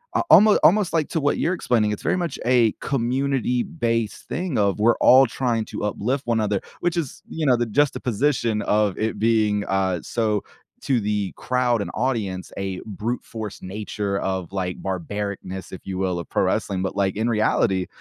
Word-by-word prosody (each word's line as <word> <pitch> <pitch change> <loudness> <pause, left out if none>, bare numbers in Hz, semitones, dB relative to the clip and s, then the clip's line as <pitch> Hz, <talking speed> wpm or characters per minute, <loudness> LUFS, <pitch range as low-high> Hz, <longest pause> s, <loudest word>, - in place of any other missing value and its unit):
a - - +3
almo 210 -4 +8
almost 195 -1 +4
like 160 -3 +1
to 160 - -1
what 145 0 +1
you're 185 +2 +1
explaining, 110 -9 +1
it's 105 - -5
very - - +1
much 170 -6 -3
a 120 -3 +4
community-based 125 - -1
thing 175 -6 -2
of 100 -1 +2
"we're 115 +2 +4
all 130 +1 +7
trying 115 -2 -1
to - - -6
uplift 130 +5 -2
one 115 -1 +2
another," 105 -2 0 0.2
which 175 0 0
is, 155 -6 -4
you 160 - -5
know, 125 -2 +5
the 120 - 0
juxtaposition 125 -2 +1
of 105 -2 +1
it 110 +1 -1
being, 110 -2 +2
uh, 95 -2 0
so 110 -3 -1 0.4
to 130 -4 +1
the 105 -2 -2
crowd 125 -3 +1
and - - -4
audience, 105 -7 -2
a 95 -1 -3
brute-force 110 +1 -5
nature 100 0 -3
of, 95 -2 -3
like, 90 -2 -3
barbarousness, 95 0 -4
if 95 - -8
you 95 -1 -3
will, 90 -2 -1
of 85 - -8
pro - - +1
wrestling, 95 -1 -1
but, 95 - -3
like, 100 -1 0
in 110 +3 0
reality, 95 -4 +1
110 Hz, 180 wpm, -23 LUFS, 100-125 Hz, 0.4 s, almo